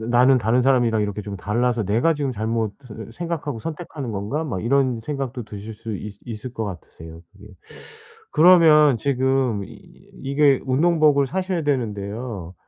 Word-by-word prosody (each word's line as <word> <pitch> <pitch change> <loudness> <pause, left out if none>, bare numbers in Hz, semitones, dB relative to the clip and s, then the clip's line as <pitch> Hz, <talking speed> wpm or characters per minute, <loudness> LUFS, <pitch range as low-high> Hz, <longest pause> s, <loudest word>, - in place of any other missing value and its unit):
'나는 125 +3 +4
다른 120 +3 +2
사람이랑 120 -4 +2
이렇게 105 0 -3
좀 100 0 -6
달라서 115 +3 0
내가 115 - +2
지금 140 -3 -2
잘못을 110 0 -4
생각하고 165 -5 -4
선택하는 155 -5 -6
건가?' 105 +11 -3
막 115 - -4
이런 130 -2 +1
생각도 135 -4 -4
드실 105 +1 -9
수 110 0 -6
있 105 +1 -8
있을 115 +2 -7
것 110 -2 -4
같으세요 80 -3 -9
그게. 100 +1 -16 0.9
그러면 155 -5 +6
지금 130 -5 0
이 - - -12 0.5
이게 140 0 +3
운동복을 150 0 +3
사셔야 185 +2 -2
되는데요. 105 - -3
125 Hz, 330 characters per minute, -22 LUFS, 105-140 Hz, 0.9 s, 그러면